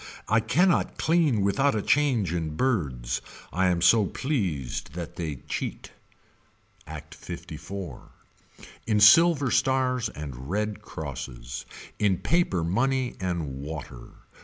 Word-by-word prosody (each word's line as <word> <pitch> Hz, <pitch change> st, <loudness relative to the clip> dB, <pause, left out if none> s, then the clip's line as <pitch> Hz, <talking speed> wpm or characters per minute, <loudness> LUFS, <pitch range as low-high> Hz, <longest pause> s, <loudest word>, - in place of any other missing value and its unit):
I 110 Hz, -, +4 dB
cannot 170 Hz, -, +2 dB
clean 155 Hz, -, +2 dB
without 135 Hz, +8 st, +2 dB
a 105 Hz, -, 0 dB
change 125 Hz, -, +2 dB
in 80 Hz, -3 st, -2 dB
birds. 70 Hz, -, -1 dB, 0.3 s
I 95 Hz, +3 st, +2 dB
am 85 Hz, -2 st, +1 dB
so 105 Hz, +2 st, +5 dB
pleased 95 Hz, -, -2 dB
that 85 Hz, -2 st, -6 dB
they 80 Hz, -4 st, -3 dB
cheat. -, -, -4 dB, 1.0 s
Act 80 Hz, -1 st, -9 dB
54. 95 Hz, -9 st, -8 dB, 0.8 s
In 105 Hz, -2 st, +2 dB
silver 145 Hz, +6 st, +6 dB
stars 130 Hz, -2 st, +2 dB
and 70 Hz, -3 st, -8 dB
red 105 Hz, +2 st, -2 dB
crosses. 65 Hz, -8 st, -7 dB, 0.3 s
In 100 Hz, -3 st, +3 dB
paper 165 Hz, -, +1 dB
money 125 Hz, +8 st, 0 dB
and 85 Hz, -7 st, -3 dB
water. 70 Hz, -4 st, -7 dB
95 Hz, 115 wpm, -26 LUFS, 75-125 Hz, 1.0 s, silver